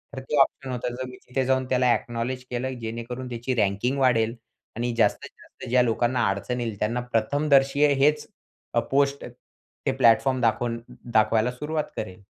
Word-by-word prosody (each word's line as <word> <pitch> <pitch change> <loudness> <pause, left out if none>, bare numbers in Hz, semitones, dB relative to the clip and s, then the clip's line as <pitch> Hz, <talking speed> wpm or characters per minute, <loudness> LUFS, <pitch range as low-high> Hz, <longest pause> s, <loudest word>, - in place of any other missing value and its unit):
तर - - -4
ते 150 - 0
ऑप्शन 135 -1 0
होतं. 125 0 -3
जर 130 +1 -4
मी 125 - -10
तिथे 130 +1 -1
जाऊन 130 0 +1
त्याला 125 -1 +3
अ‍ॅक्नॉलेज 120 +2 -3
केलं, 125 +1 -3
जेणेकरून 115 +3 -5
त्याची 120 +2 -3
रँकिंग 105 +5 0
वाढेल 115 -3 +2 0.4
आणि 120 +1 -2
जास्तीत-जास्त 115 - -2
ज्या 125 +1 +4
लोकांना 120 +1 +1
अडचण 110 +6 -2
येईल 115 -3 -3
त्यांना 115 +3 0
प्रथमदर्शी 140 +4 +2
हेच 150 +2 +2 0.5
अ, 120 - +3
पोस्ट 140 +3 0 0.6
ते - - +2
प्लॅटफॉर्म 130 +3 +4
दाखवून 115 +1 +1
द 115 - -15 0.2
दाखवायला 110 +1 +3
सुरुवात 150 +4 -3
करेल. 95 +1 -6
125 Hz, 160 wpm, -25 LUFS, 115-130 Hz, 0.6 s, ज्या